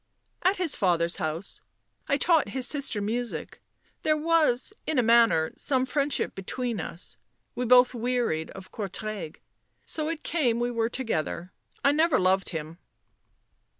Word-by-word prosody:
" - - -47
At 375 +3 +2
his 350 -5 +1
father's 170 -3 +1
house. 160 +2 -3 0.5
I 280 - +2
taught 320 - +3
his 255 - 0
sister 275 -8 +1
music. 235 +3 -4 0.4
There 310 0 +2
was, 310 -1 +2
in 315 - 0
a 250 - +4
manner, 230 -9 +4
some 260 -2 +1
friendship 280 +2 0
between 230 +3 -3
us... 165 -6 -6 0.4
we 250 - -2
both 250 +1 +6
wearied 240 -9 -1
of 190 -1 -11
Courtrai... 205 -4 -5 0.5
so 310 0 0
it 325 -1 -4
came 250 -9 +1
we 240 0 0
were 230 -1 0
together. 185 -8 -3 0.3
I 280 - +6
never 315 -1 +3
loved 185 +1 +2
him." 160 0 -6
240 Hz, 150 wpm, -27 LUFS, 190-280 Hz, 0.5 s, both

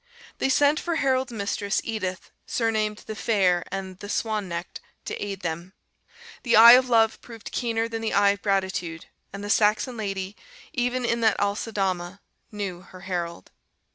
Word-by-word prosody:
They - - +1
sent 290 +3 +4
for 340 -1 -2
Harold's 260 -4 +1
mistress, 200 -1 -1
Edith, 190 -5 -4 0.2
surnamed 215 -2 -1
"the 220 - -6
Fair" 190 -6 +2
and 190 -1 -5
the 205 -1 -8
"Swan 215 -3 -1
necked," 170 +1 -6 0.2
to - - -4
aid 200 -2 -5
them. 170 +2 -5 0.7
The 235 - +2
eye 230 +2 +11
of 255 +1 +6
love 225 -2 +3
proved 230 -2 -10
keener 230 -2 -1
than 225 -1 -5
the 225 - -1
eye 200 0 +5
of 200 0 -5
gratitude, 190 -4 -1 0.3
and 195 +1 -7
the 205 - -5
Saxon 220 +4 +2
lady, 195 -2 -4 0.4
even 245 0 0
in 235 0 0
that 220 -1 +3
Aceldama, 195 -3 -1 0.3
knew 200 -4 -4
her 185 -1 -14
Harold. 175 -3 -4
205 Hz, 165 wpm, -25 LUFS, 190-230 Hz, 0.7 s, eye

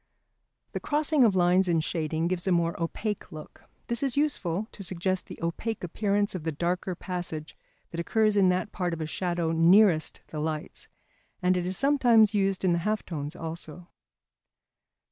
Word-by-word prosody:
The - - -3
crossing 300 -1 +2
of 215 -5 +4
lines 180 +1 +4
in 170 -2 +2
shading 160 0 -1
gives 180 +1 -2
a - - +3
more 170 -1 +2
opaque 205 +5 -3
look. 155 -2 -11 0.2
This 235 0 -2
is 275 -1 -1
useful 215 - 0
to - - -11
suggest 185 0 -2
the - - -9
opaque 205 +6 -3
appearance 205 +3 0
of 180 -4 -5
the 160 - -1
darker 175 +4 -2
passage 175 -4 -5 0.4
that 170 - -5
occurs 215 +4 +2
in 195 -2 +5
that 185 +3 0
part 180 -2 -2
of 165 - -7
a - - -1
shadow 170 0 -1
nearest 165 +1 +4
the 155 - -5
lights; 155 0 -4 0.5
and 180 0 +2
it 180 0 -1
is 185 - -2
sometimes 240 -6 +4
used 195 -2 +1
in 180 - +3
the 170 - +1
half 210 +4 -1
tones 150 -2 -5
also. 165 +1 -8
180 Hz, 175 wpm, -27 LUFS, 165-205 Hz, 0.5 s, in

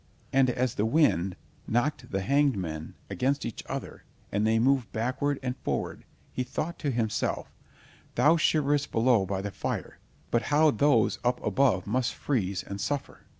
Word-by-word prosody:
And 135 -1 +4
as 125 0 0
the 105 - 0
wind 105 - +2 0.3
knocked 125 +2 0
the 95 - -1
hanged 140 +1 +3
men 80 -4 -5
against 140 +2 0
each - - -5
other, - - -6 0.3
and 105 +2 +1
they 110 0 +3
moved 125 -2 +2
backward 130 +6 -1
and 125 -1 -2
forward, - - -3 0.3
he - - -2
thought 160 +6 -4
to 145 - -1
himself: 115 -4 -1 0.6
"Thou 155 +3 +5
shiverest 145 -3 +2
below 115 -4 +3
by 95 0 -2
the 100 - -3
fire, - - -4 0.3
but 120 - +3
how 155 +1 +5
those 120 -2 +3
up 125 0 +1
above 120 -10 +2
must 125 +4 0
freeze 100 -9 -1
and 100 0 -6
suffer!" 145 -2 -4
125 Hz, 160 wpm, -28 LUFS, 105-140 Hz, 0.6 s, Thou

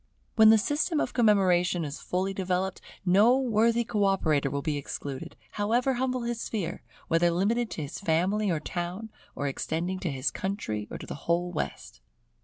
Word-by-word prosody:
When 220 -1 +8
the 220 - +8
system 295 - 0
of - - -1
commemoration 185 -7 +3
is 145 0 -6
fully 190 +2 -1
developed, 190 0 -2 0.2
no 205 +8 +5
worthy 235 -2 +2
co 215 -3 0
operator 155 -8 +2
will 140 +1 -3
be 155 - -1
excluded, 140 -1 -6 0.2
however 240 +6 +1
humble 255 0 -1
his 235 -1 -3
sphere; 205 -7 -3 0.3
whether 165 +1 +3
limited 215 +7 +1
to 155 - -4
his 140 - -6
family 195 +4 +1
or 165 -3 +1
town, 180 +7 -5 0.2
or 145 - -2
extending 170 +6 -2
to 180 - -2
his 135 -1 -1
country 110 - -3
or - - -6
to - - -9
the - - -6 0.2
whole 175 +1 +1
West. - - -5
190 Hz, 175 wpm, -28 LUFS, 165-220 Hz, 0.3 s, When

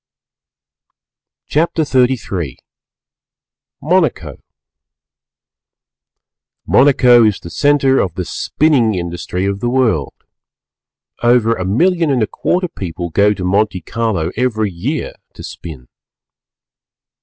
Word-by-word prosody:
CHAPTER 160 +1 0
XXXIII 125 - -1 1.3
MONACO 145 - 0 2.2
Monaco 125 -3 +5
is 105 -3 +2
the 85 - -10
centre 145 -2 +2
of 90 -4 -1
the 90 - -3
spinning 130 - +1
industry 85 +1 -4
of 100 0 -2
the 120 - -1
world. 120 - 0 1.1
Over 120 -1 +3
a 95 -5 -4
million 165 - +1
and 130 -5 +1
a - - +2
quarter 180 +1 -1
people 85 - -6
go 105 +4 +3
to 95 - -6
Monte 100 0 0
Carlo 110 -8 -2
every 110 -4 -1
year 120 - -4 0.2
to - - -10
spin. 70 -7 -9
110 Hz, 100 wpm, -16 LUFS, 90-135 Hz, 2.2 s, Monaco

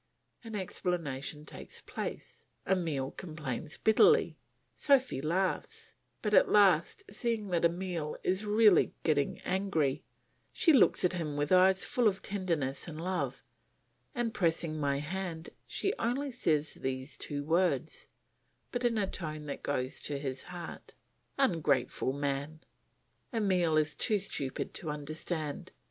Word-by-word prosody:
An 225 -2 -7
explanation 160 -7 -3
takes - - -9
place. - - -6 0.2
Emile 160 -8 0
complains 155 -4 -5
bitterly, 425 - +5 0.4
Sophy 260 - +2
laughs; 190 - -1 0.3
but 210 -1 0
at - - +6
last, 195 - +4
seeing 230 -5 -1
that 170 -2 +2
Emile 170 -3 -1
is 185 +3 +1
really 210 -2 +5
getting 145 -3 +1
angry, 180 -8 0 0.5
she 325 - +4
looks 245 -7 +5
at 180 - +2
him 155 -5 -3
with 145 0 -1
eyes 185 +1 +5
full 245 -3 +2
of 190 -2 0
tenderness 170 -10 -2
and 160 -2 -7
love, 180 +2 -2 0.7
and 240 -2 -1
pressing 165 -3 +1
my 140 -1 +1
hand, 165 +2 -4 0.2
she 395 - -1
only 265 +4 -1
says 155 -11 0
these 130 +2 -4
two 145 -1 -4
words, 170 +4 0 0.6
but 245 0 -2
in 235 -2 +2
a 205 - +2
tone 155 -5 -5
that 145 - -5
goes 130 -2 -2
to 145 - -3
his 135 -2 -4
heart, 175 -1 -9 0.4
"Ungrateful 150 - +1
man!" 140 +2 -3 0.7
Emile 185 -8 +2
is 155 -1 +2
too 215 -3 +1
stupid 145 -9 -3
to 160 - -3
understand. 150 +1 -4
170 Hz, 130 wpm, -31 LUFS, 150-200 Hz, 0.7 s, at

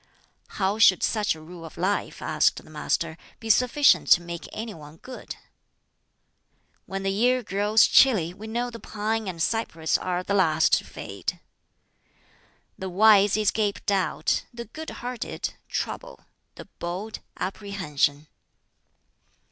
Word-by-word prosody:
"How 200 +2 0
should 190 -5 +6
such 210 -6 +1
a 155 - -12
rule 170 +1 -11
of 160 - -11
life," - - -1
asked - - +2
the - - -16
Master, 160 +1 -2 0.2
"be 225 -1 +1
sufficient 250 +6 +4
to 175 - +2
make 170 -1 -7
any 220 0 -5
one 150 -1 -13
good?" 255 +9 -9 1.5
"When 195 0 -4
the 195 - 0
year 245 +5 +2
grows 205 +2 +3
chilly, 195 -11 +4
we 210 +4 -10
know 240 +2 -2
the 230 - -9
pine 220 0 -3
and 175 -3 -5
cypress 165 -5 0
are 180 0 -2
the 200 - -2
last 160 -5 +3
to - - -12
fade. - - -6 1.4
"The 190 - -4
wise 205 +1 +5
escape 210 -1 0
doubt; 195 -2 0
the 235 -1 -7
good 315 +9 -8
hearted, 245 0 -5 0.2
trouble; - - -4 0.3
the - - -10
bold, 185 +6 -5 0.2
apprehension. 165 -8 -1
200 Hz, 135 wpm, -25 LUFS, 175-225 Hz, 1.5 s, should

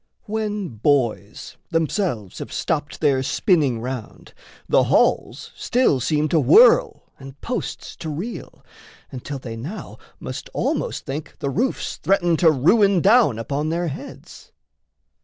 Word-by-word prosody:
When 210 -3 -3
boys 115 -4 -1
themselves 165 - -2
have - - -7
stopped 150 -2 -3
their 140 -4 +2
spinning 145 - +1
round, 125 -2 -7 0.3
The - - +3
halls - - +1
still 245 - +1
seem 150 +4 0
to 165 - +3
whirl 445 - +5 0.2
and 135 0 -12
posts 245 0 -5
to 160 - -6
reel, 175 +11 -7 0.5
Until 135 +2 -6
they 120 -3 -7
now 160 - -8 0.2
must - - -7
almost - - -2
think 145 +3 -6
the 140 - -3
roofs 250 - -2
Threaten 175 -3 +2
to 165 - +5
ruin 190 - +3
down 210 - +4
upon 140 +6 -2
their 170 +1 -1
heads. 140 - -10
155 Hz, 130 wpm, -22 LUFS, 130-195 Hz, 0.5 s, whirl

